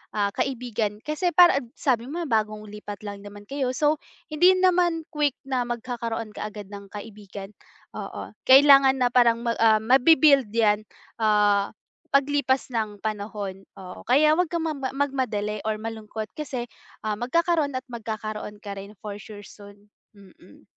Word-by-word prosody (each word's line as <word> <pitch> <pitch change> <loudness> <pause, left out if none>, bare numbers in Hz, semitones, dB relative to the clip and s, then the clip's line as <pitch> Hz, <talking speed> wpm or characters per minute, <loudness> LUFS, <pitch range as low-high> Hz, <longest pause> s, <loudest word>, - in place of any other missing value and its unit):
ah, 200 -1 +1
kaibigan 230 -4 -3
kasi 305 +4 -2
para 345 -5 +7
a - - -9
sabi 250 -4 0
mo 340 +4 -4
bagong 215 -5 -1
lipat 210 -1 -8
lang 205 -1 -6
naman 205 0 -11
kayo 260 +2 -3
so, 300 +1 +2 0.3
hindi 355 +5 +5
naman 355 -3 +2
quick 295 -4 0
na 255 -2 -2
magkakaroon 235 -2 -4
ka - - -5
agad 210 -2 -10
ng 200 -1 -9
kaibigan, 205 -1 -9 0.4
oo. - - -7 0.2
Kailangan 275 0 +8
na 245 - +2
parang 235 -1 +4
ma 235 - +1
ah, 220 -1 +4
mabi-build 270 +1 +5
yan, 215 -2 +2 0.3
ah, 205 -2 +2 0.4
paglipas 275 -2 +1
ng 215 -4 -3
panahon, 205 -2 -5
oo. 185 +1 -11
Kaya 300 +5 +5
wag 360 - +2
kang 335 0 -2
magma 275 -4 -3
magmadali 235 -7 -1
or 215 - 0
malungkot 220 0 -6
kasi, 255 -5 -5 0.3
ah, 215 -1 -2
magkakaroon 310 +2 +1
at 255 - -3
magkakaroon 215 -2 -6
ka 200 -2 -6
rin 200 +2 -11
for 205 -1 -6
sure 205 0 -11
soon, 205 +1 -15 0.2
mm. 195 -2 -18
230 Hz, 155 wpm, -25 LUFS, 210-275 Hz, 0.4 s, Kailangan